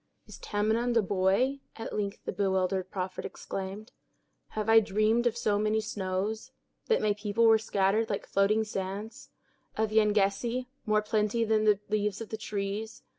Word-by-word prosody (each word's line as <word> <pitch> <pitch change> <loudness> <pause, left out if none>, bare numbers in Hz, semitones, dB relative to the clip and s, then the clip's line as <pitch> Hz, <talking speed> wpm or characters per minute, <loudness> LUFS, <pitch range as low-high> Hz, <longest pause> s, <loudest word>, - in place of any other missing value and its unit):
"Is - - -12
Tamenund 225 +3 0
a 225 - +4
boy?" 200 +9 +1 0.2
at 225 - -6
length 200 -1 -3
the - - -2
bewildered 190 -1 0
prophet 185 -1 -4
exclaimed. 195 +3 -6 0.7
"Have 215 0 -1
I 225 0 +8
dreamed 215 +3 +2
of 235 0 -1
so 210 -3 +1
many 215 +1 +1
snows—that 210 - -3
my 210 -1 +3
people 210 +2 0
were 225 -1 +6
scattered 205 +1 +1
like 200 - -2
floating 205 +3 +2
sands—of 210 +2 -6
Yengeese, 215 +3 +2 0.2
more 215 0 +3
plenty 215 +2 +1
than 215 -1 +2
the 210 -2 +4
leaves 210 -1 -1
on 225 - -7
the 220 - -4
trees! 210 +1 -4
210 Hz, 150 wpm, -29 LUFS, 195-220 Hz, 0.7 s, I